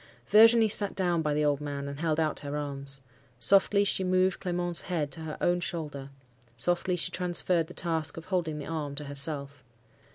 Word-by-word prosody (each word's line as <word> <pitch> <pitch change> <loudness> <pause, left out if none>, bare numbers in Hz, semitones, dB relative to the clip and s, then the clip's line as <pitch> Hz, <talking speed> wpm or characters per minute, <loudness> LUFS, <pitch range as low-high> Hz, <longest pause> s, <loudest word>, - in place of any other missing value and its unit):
Virginie 225 +1 +6
sat 205 -1 +1
down 175 -3 0
by 150 -1 -1
the 150 +1 +1
old 145 -1 +1
man, 140 -1 -5
and 140 0 -7
held 160 -1 0
out 155 -1 0
her 145 0 -5
arms. 140 -2 -4 0.4
Softly 200 - +4
she 195 -1 0
moved 185 0 +1
Clement's 175 -2 0
head 160 -6 -3
to 160 - -6
her 155 -1 -6
own 175 0 +1
shoulder; 150 -6 -5 0.5
softly 175 +8 +1
she 170 - +1
transferred 175 -2 0
the 180 - -12
task 160 -3 -2
of 165 - -8
holding 170 -5 -2
the 145 - -6
arm 150 -3 -4
to 150 - -4
herself. 140 -1 -1
160 Hz, 190 wpm, -28 LUFS, 145-180 Hz, 0.5 s, Virginie